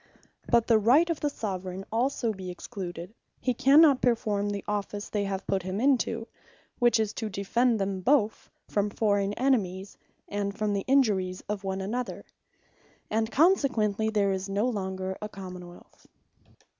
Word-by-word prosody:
But 235 Hz, -2 st, +4 dB
if -, -, -29 dB
the 225 Hz, -2 st, +4 dB
Right 260 Hz, +11 st, +5 dB
of 325 Hz, -, -3 dB
the 295 Hz, -, 0 dB
Soveraign 190 Hz, -6 st, -5 dB
also 235 Hz, 0 st, 0 dB
be 190 Hz, -2 st, -7 dB
excluded, 180 Hz, -1 st, -7 dB, 0.3 s
he 250 Hz, -, 0 dB
cannot 275 Hz, +2 st, +6 dB
performe 215 Hz, -4 st, +1 dB
the 200 Hz, -1 st, -4 dB
office 205 Hz, 0 st, -3 dB
they 205 Hz, -1 st, -1 dB
have 195 Hz, -1 st, -4 dB
put 195 Hz, -1 st, 0 dB
him 185 Hz, +3 st, -4 dB
into; 235 Hz, -3 st, +1 dB, 0.5 s
which 240 Hz, -2 st, +4 dB
is, 220 Hz, -1 st, 0 dB
to 220 Hz, -3 st, -4 dB
defend 225 Hz, +4 st, +1 dB
them 195 Hz, -1 st, -2 dB
both 225 Hz, -2 st, +1 dB, 0.2 s
from 205 Hz, 0 st, 0 dB
forraign 205 Hz, -1 st, +1 dB
enemies, 200 Hz, -7 st, 0 dB, 0.3 s
and 200 Hz, 0 st, -3 dB
from 215 Hz, -1 st, 0 dB
the 200 Hz, -1 st, -2 dB
injuries 205 Hz, -9 st, +2 dB
of 205 Hz, -1 st, -3 dB
one 190 Hz, 0 st, -3 dB
another; 235 Hz, +6 st, -4 dB, 0.9 s
and 220 Hz, +1 st, 0 dB
consequently 245 Hz, -, +2 dB
there 205 Hz, -2 st, +1 dB
is 190 Hz, +1 st, -3 dB
no 205 Hz, +4 st, +1 dB
longer 190 Hz, -4 st, -3 dB
a 210 Hz, -, -4 dB
Common 185 Hz, -3 st, -9 dB
wealth. 175 Hz, -, -17 dB
210 Hz, 160 wpm, -28 LUFS, 195-235 Hz, 0.9 s, cannot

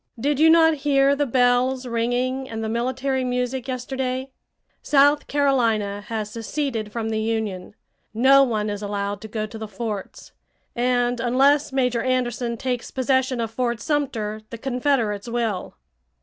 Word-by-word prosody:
"Did 285 Hz, +3 st, 0 dB
you 320 Hz, +1 st, +6 dB
not 320 Hz, 0 st, +6 dB
hear 280 Hz, -1 st, +3 dB
the 290 Hz, 0 st, 0 dB
bells 250 Hz, +1 st, +2 dB
ringing 245 Hz, +3 st, -1 dB
and 225 Hz, 0 st, -4 dB
the -, -, -2 dB
military 260 Hz, +3 st, -1 dB
music 250 Hz, +1 st, -2 dB
yesterday? 260 Hz, +1 st, -3 dB, 0.5 s
South 290 Hz, +1 st, +3 dB
Carolina 230 Hz, -8 st, +1 dB
has 215 Hz, -2 st, -4 dB
seceded 230 Hz, -2 st, -3 dB
from 225 Hz, 0 st, -3 dB
the 220 Hz, -1 st, -1 dB
Union. 215 Hz, -4 st, -3 dB, 0.4 s
No 265 Hz, +5 st, +5 dB
one 215 Hz, -5 st, -1 dB
is 205 Hz, 0 st, -5 dB
allowed 205 Hz, 0 st, -3 dB
to 220 Hz, -, -7 dB
go 215 Hz, 0 st, -3 dB
to 220 Hz, +1 st, -9 dB
the 220 Hz, -, -5 dB
forts. 210 Hz, -1 st, -6 dB, 0.4 s
And 245 Hz, 0 st, +1 dB
unless 275 Hz, +5 st, +3 dB
Major 250 Hz, -3 st, +1 dB
Anderson 245 Hz, -2 st, -1 dB
takes 250 Hz, 0 st, -3 dB
possession 260 Hz, -1 st, 0 dB
of 225 Hz, -1 st, -2 dB
Fort 240 Hz, -1 st, -1 dB
Sumter 235 Hz, -9 st, -2 dB
the 230 Hz, -, -7 dB
Confederates 245 Hz, -4 st, -1 dB
will." 230 Hz, -5 st, -2 dB
245 Hz, 150 wpm, -23 LUFS, 220-265 Hz, 0.5 s, you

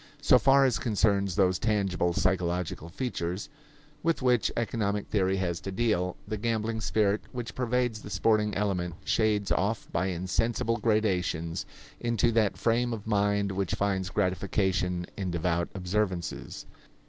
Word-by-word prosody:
So 130 Hz, -3 st, +5 dB
far 135 Hz, +1 st, +5 dB
as 125 Hz, -3 st, +1 dB
concerns 100 Hz, -, +1 dB
those 95 Hz, -2 st, +3 dB
tangible 100 Hz, -5 st, +1 dB
psychological 90 Hz, -2 st, -1 dB
features 95 Hz, -, -3 dB, 0.5 s
with 165 Hz, -5 st, 0 dB
which 125 Hz, -3 st, +3 dB
economic 105 Hz, -3 st, -1 dB
theory 95 Hz, -2 st, +1 dB
has 90 Hz, -2 st, -1 dB
to 95 Hz, -, -6 dB
deal, 95 Hz, -4 st, 0 dB
the 110 Hz, +1 st, -3 dB
gambling 110 Hz, 0 st, -1 dB
spirit 105 Hz, -1 st, +1 dB
which 120 Hz, -2 st, -5 dB
pervades 125 Hz, -2 st, 0 dB
the -, -, -9 dB
sporting 105 Hz, +1 st, +2 dB
element 90 Hz, -4 st, -1 dB
shades 105 Hz, -3 st, +1 dB
off 105 Hz, +3 st, 0 dB
by 95 Hz, +3 st, 0 dB
insensible 115 Hz, +6 st, 0 dB
gradations 95 Hz, -7 st, 0 dB, 0.3 s
into 120 Hz, 0 st, +1 dB
that 110 Hz, -3 st, +2 dB
frame 120 Hz, +1 st, +1 dB
of 105 Hz, -3 st, -6 dB
mind 100 Hz, -1 st, +1 dB
which 95 Hz, -1 st, -1 dB
finds 95 Hz, -2 st, 0 dB
gratification 90 Hz, -2 st, 0 dB
in 95 Hz, -3 st, -2 dB
devout 85 Hz, 0 st, 0 dB
observances. 95 Hz, -1 st, -2 dB
100 Hz, 135 wpm, -28 LUFS, 90-115 Hz, 0.5 s, So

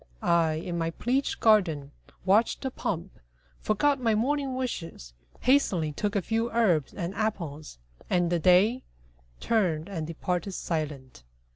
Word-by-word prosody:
I, 165 Hz, -2 st, +3 dB
in 170 Hz, +2 st, -4 dB
my 165 Hz, 0 st, 0 dB
pleached 250 Hz, +10 st, -1 dB
garden, 165 Hz, -11 st, +3 dB, 0.3 s
watched 205 Hz, +5 st, +3 dB
the 265 Hz, -, -2 dB
pomp, 180 Hz, -6 st, -4 dB, 0.4 s
Forgot 275 Hz, +6 st, +1 dB
my 225 Hz, -3 st, +2 dB
morning 270 Hz, +3 st, 0 dB
wishes, 165 Hz, -, -5 dB, 0.3 s
hastily 195 Hz, -, +2 dB
Took 205 Hz, +8 st, -2 dB
a 200 Hz, -, +1 dB
few 225 Hz, +3 st, 0 dB
herbs 185 Hz, -, +2 dB
and 175 Hz, -1 st, -4 dB
apples, 170 Hz, -, -4 dB, 0.3 s
and 175 Hz, -1 st, +1 dB
the 175 Hz, -, +2 dB
Day 190 Hz, +9 st, +4 dB, 0.6 s
Turned 175 Hz, -9 st, 0 dB
and 165 Hz, -6 st, -4 dB
departed 180 Hz, +3 st, -3 dB
silent. 150 Hz, -, -4 dB
185 Hz, 135 wpm, -27 LUFS, 165-225 Hz, 0.6 s, Day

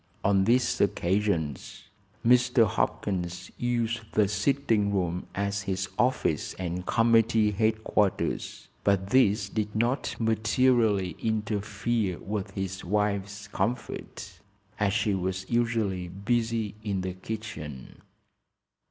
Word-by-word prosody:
On 95 Hz, -1 st, +3 dB
these 120 Hz, +3 st, +2 dB
occasions 85 Hz, -, 0 dB, 0.4 s
Mr. 125 Hz, 0 st, +5 dB
Hopkins 90 Hz, -3 st, -2 dB
used 120 Hz, -1 st, 0 dB
the 105 Hz, -2 st, +4 dB
sitting 105 Hz, -1 st, +1 dB
room 90 Hz, -2 st, -1 dB
as 100 Hz, +1 st, -1 dB
his 95 Hz, -1 st, -2 dB
office 120 Hz, -, +1 dB
and 90 Hz, 0 st, -4 dB
committee 115 Hz, -2 st, +4 dB
headquarters, 110 Hz, -1 st, 0 dB, 0.2 s
but 100 Hz, -1 st, +1 dB
this 105 Hz, -6 st, +4 dB
did 105 Hz, 0 st, -3 dB
not 120 Hz, +5 st, 0 dB
materially 110 Hz, -4 st, +2 dB
interfere 110 Hz, -2 st, -1 dB
with 105 Hz, -1 st, -4 dB
his 95 Hz, 0 st, -4 dB
wife's 100 Hz, +1 st, -1 dB
comfort, 120 Hz, +3 st, -4 dB, 0.4 s
as 105 Hz, -2 st, +2 dB
she 105 Hz, -1 st, +1 dB
was 95 Hz, 0 st, -2 dB
usually 115 Hz, -6 st, 0 dB
busy 110 Hz, +3 st, -1 dB
in 100 Hz, -3 st, -1 dB
the 90 Hz, 0 st, -3 dB
kitchen. 95 Hz, -9 st, -7 dB
105 Hz, 105 wpm, -28 LUFS, 95-115 Hz, 0.4 s, Mr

